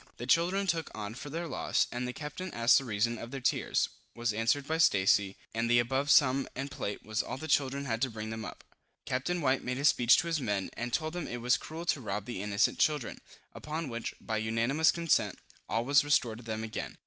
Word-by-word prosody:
The 120 - -5
children 175 +8 +2
took 165 -4 -1
on 105 0 -5
for 140 +4 -8
their 165 +3 -4
loss, - - +1
and 125 +1 -3
the - - -3
captain 150 +7 -6
asked 115 +3 +5
the 135 - -7
reason 115 +1 0
of 115 - -7
their 135 +1 -5
tears, 125 - +1 0.3
was 120 -2 -1
answered 115 +6 +1
by 160 +1 -1
Stacy, 100 -7 +3 0.2
and 115 +1 -1
the 120 - +5
above 130 +4 +1
sum 135 -2 +5
and 135 +2 -4
plate 105 -7 -5
was 110 0 0
all - - -6
the 160 - -6
children 140 -1 +1
had 115 -3 -2
to 130 - +2
bring 110 -1 -6
them 110 0 -5
up. - - -8 0.4
Captain 150 +8 -1
White 135 -2 +1
made 125 0 -2
a 140 - -2
speech 125 -1 +6
to - - +1
his 165 -3 -1
men, 100 -5 -2
and 120 +1 -4
told 155 +6 -1
them 175 -2 -4
it 120 - -4
was 120 +1 +2
cruel 165 +2 -7
to 155 -5 0
rob 105 -3 -3
the 120 -5 -5
innocent 100 +1 +1
children; 150 -5 +1 0.3
upon 155 0 -5
which, 115 -1 -5
by 110 - -3
unanimous 115 +8 +2
consent, 150 - +1 0.3
all 115 +1 0
was 140 +2 +5
restored 120 -6 +1
to - - -12
them 110 -1 -4
again. 110 - -5
125 Hz, 230 wpm, -30 LUFS, 115-150 Hz, 0.4 s, speech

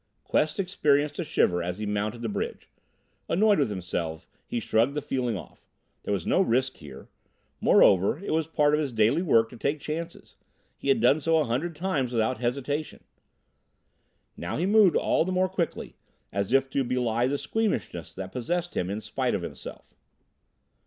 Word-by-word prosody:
Quest 155 +5 0
experienced 150 -6 +1
a - - 0
shiver 90 - +1
as 90 +1 -3
he 105 - -4
mounted 105 +3 -2
the - - -1
bridge. 105 - -4 0.6
Annoyed 210 +1 +4
with 140 -6 +2
himself, 85 -4 -4 0.2
he 120 - -2
shrugged 115 +5 +1
the - - +1
feeling 125 -5 -1
off. 85 - -13 0.3
There - - -4
was 95 -5 -1
no - - +3
risk 130 -5 +1
here. 70 -3 -11 0.5
Moreover, 100 +6 +5
it 195 - -5
was 160 -1 +1
a - - -30
part 150 -2 +2
of 150 - +3
his 145 -4 -1
daily 115 +7 +2
work 115 -10 +4
to - - -10
take 140 +6 -1
chances; 165 +4 -6 0.4
he - - -8
had 135 -5 +3
done 135 +6 +4
so 165 +2 +2
a 155 - +3
hundred 150 +8 -2
times 150 -7 -1
without 120 +2 0
hesitation. 140 +5 -3 1.3
Now 85 - -4
he 170 - 0
moved 205 -3 +5
all - - +2
the 185 - -3
more 185 0 +2
quickly, 185 -3 -3 0.4
as 100 +1 -2
if 135 0 +4
to 135 - +1
belie 120 -1 0
the 140 +2 0
squeamishness 215 - -2
that 95 -1 -6
possessed 175 +8 -3
him 90 - -1
in 105 +2 -3
spite - - -1
of - - -3
himself. - - -9
135 Hz, 180 wpm, -27 LUFS, 110-160 Hz, 1.3 s, Moreover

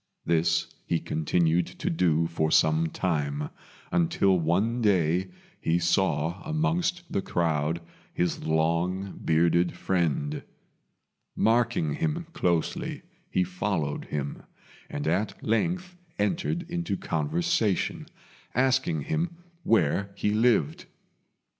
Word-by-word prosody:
This 85 0 +2 0.2
he 85 - +1
continued 85 +1 +1
to 185 +1 -3
do 85 - +2
for 80 -1 0
some 80 +1 +3
time, 75 -5 -1 0.4
until 165 - +3
one 100 +9 +1
day 90 -3 +2 0.3
he 80 +1 +1
saw 85 -1 +1
amongst 170 +2 0
the 100 - 0
crowd 80 -2 0 0.3
his 90 0 -1
long 85 +5 0
bearded 85 +2 +3
friend. 80 -5 -1 0.9
Marking 115 -9 +2
him 165 - -1
closely, 85 -3 -1 0.3
he 90 - +2
followed 90 -5 -2
him, 70 -1 -4 0.5
and 70 - -4
at 95 +7 -1
length 175 - 0 0.2
entered 165 - -1
into 170 - -2
conversation, 85 +6 0 0.5
asking 130 - +2
him 165 - -2 0.2
where 100 - +2
he 105 - 0
lived. 105 - +2
90 Hz, 105 wpm, -27 LUFS, 80-115 Hz, 0.9 s, some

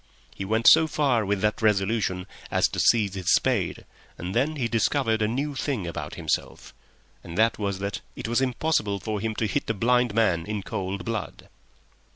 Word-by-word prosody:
He 95 - -6
went 110 +3 +1
so 160 - +8
far 135 -7 +1
with 100 -1 -1
that 105 +2 0
resolution 100 -3 +1 0.2
as - - +3
to - - -4
seize 105 -5 +3
his 95 -1 -1
spade, 115 -10 +1 0.3
and 90 +2 -5
then 140 +7 +1
he 125 -5 -1
discovered 115 0 +1
a 105 - +2
new 140 +6 -2
thing 130 -7 -2
about 85 -3 -5
himself, - - -3 0.5
and 85 - -8
that 115 +1 +3
was 100 -2 -1
that 100 +1 -4
it - - -5
was 120 +3 +1
impossible 125 -6 0
for 105 +2 -3
him 110 +1 -3
to 110 - -1
hit 105 - -2
a 115 - 0
blind 120 +1 +2
man 90 -7 +2
in 105 -2 -3
cold 95 0 -4
blood. 115 -3 -5
110 Hz, 190 wpm, -25 LUFS, 100-120 Hz, 0.5 s, so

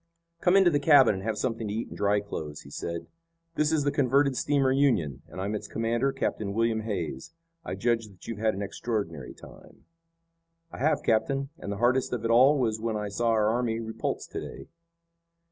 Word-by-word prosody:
"Come 180 +3 +4
into 190 -3 +5
the 145 - +2
cabin 140 -5 +6
and 95 0 -6
have 110 0 -2
something 115 -3 -2
to 100 - -3
eat 115 - -3
and - - -9
dry 100 0 +2
clothes," 75 -7 -6
he 70 - -14
said. 85 +3 -5 0.5
"This 150 -1 +1
is 155 -2 +2
the 145 - +1
converted 140 0 +2
steamer 140 0 +2
Union, 105 - +1
and 85 - -10
I'm 100 +3 -2
its 105 - -4
commander, 115 +4 0
Captain 100 -6 -2
William 115 -1 +1
Hays. 90 - -4 0.3
I - - -4
judge 115 -2 0
that 95 -3 -16
you've 115 -3 -5
had 110 -2 +1
an 100 - -3
extraordinary 100 - -4
time." - - -16 0.9
"I - - -9
have, 150 +1 +1
captain, 135 +5 +1
and 100 - -5
the 100 - -3
hardest 125 +3 +2
of 115 -2 -3
it 115 - +1
all 130 +5 +6
was 110 -4 0
when 110 -1 -1
I 105 -1 -3
saw 115 +4 0
our 110 -2 +3
army 115 -1 0
repulsed 110 -1 -4
to - - -4
day." - - -9
115 Hz, 205 wpm, -27 LUFS, 105-135 Hz, 0.9 s, cabin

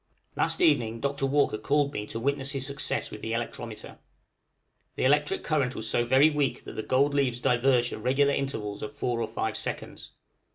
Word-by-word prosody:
Last - - +1
evening 115 - +3
Dr. 140 0 -1
Walker 140 -6 +1
called 140 +4 +1
me 105 - -4
to 115 - -5
witness 140 +2 -1
his 135 -1 -1
success 140 0 -1
with - - -8
the 115 - -3
electrometer. 115 -1 -6 1.0
The - - -2
electric 150 +2 +2
current 140 -5 0
was 110 - -3
so 120 +2 +1
very 135 +6 +5
weak 140 -5 -1
that - - -8
the - - -3
gold 140 +5 +2
leaves 130 -4 +1
diverged 125 0 +2
at - - -6
regular 140 +4 +2
intervals 110 -8 -3
of 110 - -5
four 125 -5 -2
or 115 - -1
five 110 0 -3
seconds. - - -4
130 Hz, 190 wpm, -27 LUFS, 115-140 Hz, 1.0 s, very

